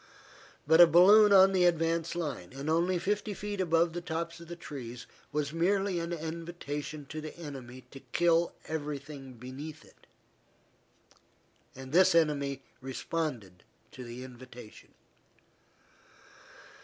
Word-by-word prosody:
But 160 Hz, +3 st, +6 dB
a 175 Hz, -, +10 dB
balloon 200 Hz, +5 st, +7 dB
on 195 Hz, -1 st, +7 dB
the 185 Hz, -2 st, +3 dB
advance 165 Hz, 0 st, +1 dB
line, 145 Hz, -, -4 dB
and 140 Hz, +3 st, -3 dB
only 175 Hz, +3 st, +2 dB
fifty 205 Hz, +3 st, -2 dB
feet 205 Hz, -1 st, -4 dB
above 165 Hz, -1 st, +2 dB
the 175 Hz, -, -4 dB
tops 170 Hz, 0 st, -4 dB
of 170 Hz, -, -12 dB
the 175 Hz, -, -7 dB
trees, 125 Hz, -7 st, -8 dB, 0.3 s
was 150 Hz, 0 st, -2 dB
merely 190 Hz, +2 st, +1 dB
an 170 Hz, +1 st, -4 dB
invitation 160 Hz, -3 st, -5 dB
to 155 Hz, -, -5 dB
the 155 Hz, +1 st, -8 dB
enemy 130 Hz, -6 st, -9 dB
to 135 Hz, -, -10 dB
kill 170 Hz, 0 st, +3 dB, 0.2 s
everything 145 Hz, -3 st, -6 dB
beneath 140 Hz, +6 st, -9 dB
it. -, -, -23 dB, 1.7 s
And 130 Hz, 0 st, -9 dB
the 180 Hz, -1 st, +6 dB
enemy 140 Hz, -3 st, -1 dB, 0.2 s
responded 130 Hz, -, -4 dB, 0.3 s
to 130 Hz, -, -9 dB
the 120 Hz, +1 st, -8 dB
invitation. 125 Hz, -3 st, -13 dB
160 Hz, 130 wpm, -30 LUFS, 135-175 Hz, 1.7 s, a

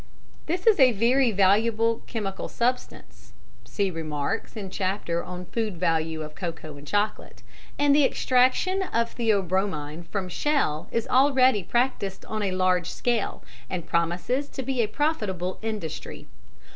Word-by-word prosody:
This 355 Hz, +3 st, -2 dB
is 445 Hz, -6 st, +5 dB
a 255 Hz, -3 st, +7 dB
very 240 Hz, +5 st, +3 dB
valuable 220 Hz, +3 st, +3 dB
chemical 200 Hz, -5 st, -4 dB
substance 250 Hz, +2 st, -3 dB, 0.3 s
(see 200 Hz, -2 st, -1 dB
remarks 160 Hz, +7 st, -3 dB
in 195 Hz, -3 st, -6 dB
chapter 185 Hz, -3 st, -2 dB
on 180 Hz, 0 st, -7 dB
Food 215 Hz, -1 st, -3 dB
Value 160 Hz, -2 st, 0 dB
of 150 Hz, 0 st, -8 dB
Cocoa 165 Hz, -4 st, -6 dB
and 145 Hz, +1 st, -12 dB
Chocolate), 205 Hz, +4 st, -2 dB, 0.3 s
and 285 Hz, -1 st, +4 dB
the 295 Hz, -, +5 dB
extraction 260 Hz, +10 st, +2 dB
of 230 Hz, -11 st, -1 dB
theobromine 185 Hz, -7 st, -1 dB
from 190 Hz, +1 st, -3 dB
shell 180 Hz, -, 0 dB
is 230 Hz, -1 st, -1 dB
already 260 Hz, -4 st, +4 dB
practised 200 Hz, -2 st, -1 dB
on 215 Hz, 0 st, -3 dB
a 200 Hz, -, 0 dB
large 185 Hz, -1 st, +1 dB
scale, 235 Hz, 0 st, -1 dB, 0.3 s
and 175 Hz, -3 st, -4 dB
promises 175 Hz, -, 0 dB
to 265 Hz, -, -5 dB
be 260 Hz, -1 st, 0 dB
a 220 Hz, -, +1 dB
profitable 205 Hz, -, -1 dB
industry. 215 Hz, -8 st, -5 dB
205 Hz, 140 wpm, -26 LUFS, 180-250 Hz, 0.3 s, a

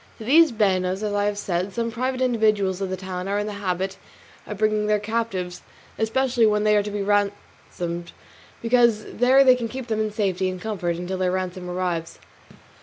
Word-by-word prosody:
To -, -, -9 dB
these 315 Hz, +4 st, +6 dB
banos, 190 Hz, -3 st, +1 dB
as 210 Hz, -1 st, -1 dB
I 205 Hz, 0 st, +1 dB
have 205 Hz, 0 st, -1 dB
said, 190 Hz, -1 st, -2 dB
some 230 Hz, -1 st, -2 dB
private 255 Hz, +2 st, -2 dB
individuals 215 Hz, -6 st, +1 dB
of 195 Hz, -, -2 dB
the 185 Hz, -, -3 dB
town 185 Hz, 0 st, -5 dB
are 200 Hz, +1 st, 0 dB
in 205 Hz, -, -1 dB
the 210 Hz, -, -4 dB
habit 190 Hz, 0 st, -2 dB, 0.5 s
of 210 Hz, -, -6 dB
bringing 215 Hz, 0 st, +1 dB
their 210 Hz, 0 st, +3 dB
captives, 205 Hz, -4 st, -3 dB, 0.4 s
especially 240 Hz, +1 st, +2 dB
when 210 Hz, 0 st, +2 dB
they 210 Hz, 0 st, +4 dB
are 205 Hz, -, +4 dB
to 205 Hz, -, -5 dB
be 205 Hz, -1 st, -3 dB
ransomed; 195 Hz, -4 st, -2 dB, 0.5 s
because 235 Hz, -2 st, +3 dB
there 255 Hz, +4 st, +4 dB
they 260 Hz, -1 st, +7 dB
can 245 Hz, -2 st, -2 dB
keep 255 Hz, +2 st, -6 dB
them 220 Hz, -1 st, 0 dB
in 215 Hz, -1 st, -1 dB
safety 190 Hz, -3 st, 0 dB
and 185 Hz, 0 st, -5 dB
comfort 180 Hz, -4 st, -2 dB
until 180 Hz, +2 st, -4 dB
their 185 Hz, -1 st, +1 dB
ransom 185 Hz, -1 st, -3 dB
arrives. 180 Hz, -2 st, -3 dB
205 Hz, 195 wpm, -23 LUFS, 185-225 Hz, 0.5 s, they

